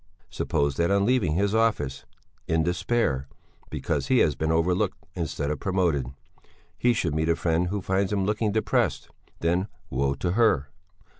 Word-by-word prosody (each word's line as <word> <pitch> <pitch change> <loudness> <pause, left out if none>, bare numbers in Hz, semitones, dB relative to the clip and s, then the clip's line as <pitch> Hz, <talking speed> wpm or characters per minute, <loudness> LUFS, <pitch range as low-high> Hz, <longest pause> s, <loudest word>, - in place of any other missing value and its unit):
Supposing 70 -2 0
that 85 - +2
on 100 0 +3
leaving 125 -9 +2
his 100 +3 +1
office, 110 -12 0 0.4
in 80 0 +2
despair 85 - 0 0.4
because - - -2
he 130 - +3
has 75 - +4
been 80 +2 -1
overlooked 85 +3 +1 0.2
instead 75 -4 -2
of 75 - -3
promoted, 90 -9 0 0.7
he 125 - +2
should 90 -9 0
meet 80 +1 0
a 85 - +4
friend 85 +1 0
who 100 +1 -3
finds 95 +1 0
him 100 -2 +1
looking 105 +1 0
depressed, 110 +1 0 0.3
then 90 +4 +1 0.2
woe 70 +2 0
to 85 +5 -2
her! 90 - +2
90 Hz, 160 wpm, -26 LUFS, 75-100 Hz, 0.7 s, has